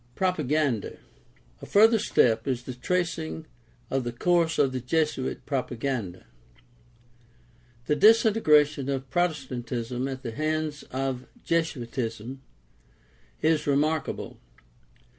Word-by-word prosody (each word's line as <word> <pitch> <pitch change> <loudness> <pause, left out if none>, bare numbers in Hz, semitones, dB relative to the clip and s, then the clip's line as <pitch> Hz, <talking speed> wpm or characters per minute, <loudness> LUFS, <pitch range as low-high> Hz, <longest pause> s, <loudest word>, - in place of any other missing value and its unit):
Propaganda. 150 - 0 0.3
— - - -33
A - - -9
further 220 +2 +5
step 115 - +2
is 125 -2 -1
the 130 - -6
tracing 160 +2 -2 0.5
of 135 -1 0
the 120 - -3
course 165 +5 +1
of 140 -2 +3
the 130 - -3
Jesuit 135 +1 -1
propaganda. 125 - -3 1.6
The 150 - +1
disintegration 155 - +4
of 135 -1 -3
Protestant 135 -9 -1
ism 125 +1 -2
at 130 0 -6
the 120 - -4
hands 155 +2 -2
of 130 -1 -3 0.2
Jesuitism 125 -6 -2 1.0
is 155 -1 +2
remarkable. 150 +2 -1
140 Hz, 105 wpm, -27 LUFS, 125-160 Hz, 1.6 s, further